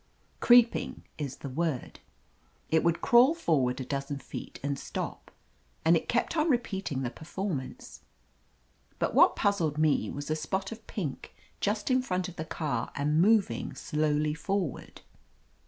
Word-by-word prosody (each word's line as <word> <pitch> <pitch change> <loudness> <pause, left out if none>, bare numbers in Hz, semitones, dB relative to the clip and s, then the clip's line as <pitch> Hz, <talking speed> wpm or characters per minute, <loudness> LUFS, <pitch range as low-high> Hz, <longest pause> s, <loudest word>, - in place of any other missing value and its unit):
Creeping 240 -1 +4 0.2
is 140 -3 -3
the - - -3
word. 155 -1 -2 0.7
It 160 0 +3
would 170 0 +1
crawl 250 +6 +6
forward 140 - +1
a 130 - -4
dozen 140 +1 -3
feet - - -8
and 140 -1 -2
stop, - - -5 0.6
and 165 +1 +6
it 165 - -2
kept 240 +7 +1
on 315 +1 +2
repeating 195 - -1
the 120 - -2
perform 175 +1 -3
ance. 130 0 -11 1.0
But - - -1
what - - +6
puzzled 170 -7 +1
me 155 -1 +2
was 145 +2 -5
a - - +2
spot 190 +6 -3
of 225 -1 -10
pink, 160 -10 -5 0.2
just 210 +4 0
in 255 0 +4
front 185 -6 -2
of 180 - -10
the 160 - -5
car 140 -8 -3
and 150 +3 +2
moving 210 +1 +2
slowly 150 -1 0
forward. 180 - -3
160 Hz, 155 wpm, -29 LUFS, 145-205 Hz, 1.0 s, crawl